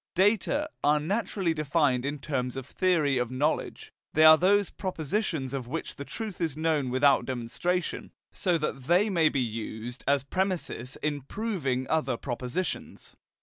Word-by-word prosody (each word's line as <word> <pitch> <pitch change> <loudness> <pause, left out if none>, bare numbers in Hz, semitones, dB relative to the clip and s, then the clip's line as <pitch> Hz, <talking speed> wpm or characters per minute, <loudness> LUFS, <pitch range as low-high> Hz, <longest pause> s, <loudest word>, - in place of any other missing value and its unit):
"Data" 210 - +2 0.2
are 150 +1 +4
naturally 190 +1 -1
defined 145 -4 +1
in 145 +1 -2
terms 130 -3 -3
of 135 -1 -5
theory 155 -5 +1
of 125 -2 -1
knowledge: 140 +5 -2 0.2
they 155 - +5
are 155 0 +10
those 200 +4 +3
propositions 160 - -2
of 130 -3 -4
which 165 +6 -4
the 140 - -6
truth 210 +4 -6
is 160 -4 -1
known 155 -4 +1
without 135 +2 +4
demonstration, 135 +8 -2 0.2
so 180 -3 +1
that 140 -4 -3
they 185 +7 +3
may 165 -4 +4
be 140 - -1
used 115 +1 -4
as 140 -1 +3
premisses 175 -6 -2
in 145 -2 -1
proving 140 - -2
other 135 -6 0
propositions. 125 +8 -4
150 Hz, 150 wpm, -28 LUFS, 130-180 Hz, 0.2 s, are